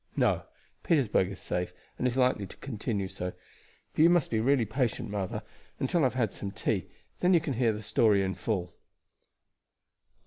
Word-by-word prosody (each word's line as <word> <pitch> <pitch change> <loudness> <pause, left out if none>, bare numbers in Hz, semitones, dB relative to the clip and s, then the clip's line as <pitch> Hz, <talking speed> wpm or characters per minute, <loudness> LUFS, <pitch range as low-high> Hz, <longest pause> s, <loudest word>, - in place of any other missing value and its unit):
"No; - - +2 0.4
Petersburg 125 - +2
is 95 - -7
safe, 90 0 -2 0.3
and 125 - +2
is 125 +1 -1
likely 125 -6 +2
to - - -13
continue 110 -6 -3
so. 90 -1 -5 0.6
But - - +1
you 165 - +8
must 175 -4 +3
really 120 +5 +3
be 120 -4 +1
patient, 115 -1 -1
mother, 100 -3 -3 0.4
until 135 +6 +1
I - - +4
have 130 - +1
had 115 -6 +1
some 100 - -4
tea, - - -1 0.3
then 180 0 +4
you - - +6
can 155 -3 -3
hear 120 -1 +2
the 105 0 -5
story 105 -2 +3
in 95 0 -1
full." 90 -6 -2
115 Hz, 180 wpm, -29 LUFS, 100-130 Hz, 0.6 s, you